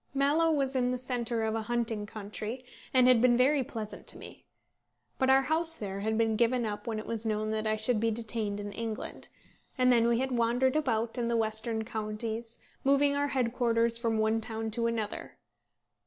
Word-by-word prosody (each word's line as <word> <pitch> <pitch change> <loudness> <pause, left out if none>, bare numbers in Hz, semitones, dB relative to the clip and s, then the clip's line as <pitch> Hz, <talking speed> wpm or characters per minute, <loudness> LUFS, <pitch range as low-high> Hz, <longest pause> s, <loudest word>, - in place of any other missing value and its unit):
Mallow 295 +4 +3
was 275 -3 0
in 250 -1 +2
the 250 - -1
centre 240 -2 -2
of 220 0 0
a 225 - -1
hunting 225 -2 -2
country, 215 +3 -6 0.3
and 255 -1 +5
had 250 -3 +5
been 240 -1 +5
very 270 +2 +3
pleasant 220 -3 -7
to - - -7
me. - - -12 0.7
But 260 - +2
our 270 0 +5
house 325 +3 +1
there 195 -2 -5
had 220 +2 -1
been 225 -1 +2
given 235 +1 +2
up 210 0 -5
when 225 -2 -2
it 215 - -5
was 230 -1 -3
known 215 -1 -1
that 220 0 -1
I 215 - +2
should 220 +1 0
be 225 +1 +1
detained 215 -2 +1
in 205 0 -5
England; 225 0 -6 0.5
and 255 -1 +4
then 230 -1 +4
we 235 0 +3
had 265 +2 -1
wandered 245 +2 +2
about 235 -5 0
in 235 - 0
the 235 0 +1
western 220 0 -1
counties, 220 +1 -3 0.3
moving 280 +1 +3
our 285 0 +1
headquarters 235 -3 +1
from 230 -2 0
one 220 +1 +1
town 225 -1 -4
to 230 +1 0
another. 225 -2 -4
230 Hz, 200 wpm, -30 LUFS, 220-255 Hz, 0.7 s, and